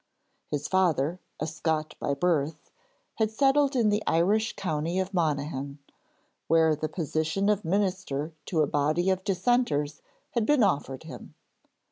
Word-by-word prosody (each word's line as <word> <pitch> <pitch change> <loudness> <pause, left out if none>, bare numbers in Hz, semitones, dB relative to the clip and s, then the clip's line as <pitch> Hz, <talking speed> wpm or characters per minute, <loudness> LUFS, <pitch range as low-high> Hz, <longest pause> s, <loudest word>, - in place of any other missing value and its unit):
His 145 0 -2
father, 175 -3 +1 0.2
a - - -1
Scot 155 0 -2
by 140 - -1
birth, 155 -1 -1 0.5
had 220 -1 +2
settled 275 +4 +3
in 230 -4 +3
the 210 +1 +1
Irish 205 +7 +2
county 165 -1 -2
of 190 +1 -1
Monaghan, 145 -4 -1 0.7
where 160 -1 +4
the 155 +1 -3
position 160 +4 -1
of 210 -1 +1
minister 180 -5 -1
to 160 -4 +1
a - - +4
body 155 +6 +1
of 190 0 -1
dissenters 190 - 0 0.3
had 235 -3 0
been 295 -5 +4
offered 140 -8 0
him. 160 - -10
165 Hz, 140 wpm, -27 LUFS, 150-200 Hz, 0.7 s, where